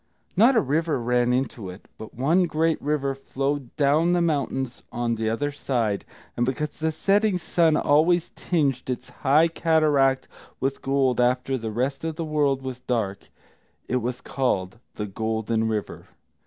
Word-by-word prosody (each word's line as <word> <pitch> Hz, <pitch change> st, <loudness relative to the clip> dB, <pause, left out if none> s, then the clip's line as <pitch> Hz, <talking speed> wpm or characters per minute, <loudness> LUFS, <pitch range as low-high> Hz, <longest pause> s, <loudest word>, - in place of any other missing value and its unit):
Not 235 Hz, +8 st, +5 dB
a -, -, +5 dB
river 150 Hz, +1 st, 0 dB
ran 120 Hz, +1 st, +1 dB
into 125 Hz, -6 st, -2 dB
it, 90 Hz, +3 st, -11 dB
but 110 Hz, -, -9 dB
one 160 Hz, +9 st, +3 dB
great 160 Hz, 0 st, 0 dB
river 140 Hz, -2 st, 0 dB
flowed 135 Hz, -1 st, -3 dB
down 155 Hz, +4 st, +3 dB
the 175 Hz, -, +3 dB
mountains 135 Hz, -6 st, -1 dB
on 120 Hz, -1 st, -1 dB
the 110 Hz, -1 st, -1 dB
other 145 Hz, +6 st, -1 dB
side, 120 Hz, -8 st, -1 dB, 0.3 s
and 120 Hz, -, 0 dB
because 130 Hz, +4 st, -1 dB
the 160 Hz, 0 st, 0 dB
setting 200 Hz, +4 st, +2 dB
sun 165 Hz, -2 st, +2 dB
always 165 Hz, +4 st, +3 dB
tinged 140 Hz, -8 st, -1 dB
its 125 Hz, 0 st, -4 dB
high 150 Hz, +4 st, +5 dB
cataract 150 Hz, -5 st, +2 dB, 0.3 s
with 135 Hz, +1 st, -2 dB
gold 135 Hz, -2 st, +1 dB
after 125 Hz, +2 st, +1 dB
the 115 Hz, -3 st, -4 dB
rest 130 Hz, +7 st, -2 dB
of 160 Hz, -1 st, -3 dB
the 165 Hz, -, -3 dB
world 145 Hz, -3 st, +1 dB
was 130 Hz, -1 st, -5 dB
dark, 115 Hz, -6 st, -3 dB, 0.6 s
it 125 Hz, -, +1 dB
was 125 Hz, +1 st, -3 dB
called 110 Hz, -8 st, -1 dB, 0.2 s
the 105 Hz, -, -3 dB
Golden 110 Hz, +2 st, -1 dB
River. 110 Hz, -2 st, -4 dB
135 Hz, 160 wpm, -25 LUFS, 120-155 Hz, 0.6 s, Not